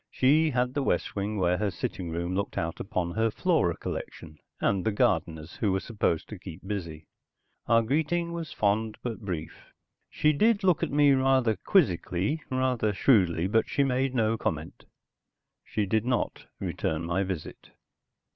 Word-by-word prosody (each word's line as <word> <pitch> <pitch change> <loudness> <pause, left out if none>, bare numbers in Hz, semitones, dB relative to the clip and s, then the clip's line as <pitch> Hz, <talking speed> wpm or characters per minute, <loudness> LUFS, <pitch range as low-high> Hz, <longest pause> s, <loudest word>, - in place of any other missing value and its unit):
She 155 +5 +3
had 125 -2 0
the 145 - 0
west 135 - -1
wing 105 +1 -2
where 90 -1 +1
her 105 -1 +1
sitting 90 -1 -4
room 85 +2 -3
looked 100 +1 -2
out 80 0 -2
upon 90 -4 -2
her 110 +4 +1
flora - - +1
collection 75 0 -7 0.2
and 95 -2 +1
the 110 - +1
gardeners 80 -5 0
who 105 - +1
were 95 - +1
supposed 100 -6 -1
to 105 - -8
keep 90 0 -10
busy. 85 -6 -5 0.6
Our 115 0 +4
greeting 160 +7 0
was 165 -2 -5
fond, 105 +1 0
but 120 -3 -4
brief. 85 -5 -6 0.4
She 155 0 +2
did 215 +6 +3
look 180 -4 +3
at - - 0
me 145 0 +4
rather 130 -4 +3
quizzically, 100 - +1
rather 130 -5 0
shrewdly, 95 -7 +3
but 110 +4 +1
she 140 - +2
made 130 0 0
no 115 -1 +1
comment. 80 0 -4 0.8
She 105 - -2
did 110 +2 +1
not 125 0 -2
return 80 +1 -2
my 85 +3 0
visit. 95 -5 -5
110 Hz, 165 wpm, -28 LUFS, 90-130 Hz, 0.8 s, Our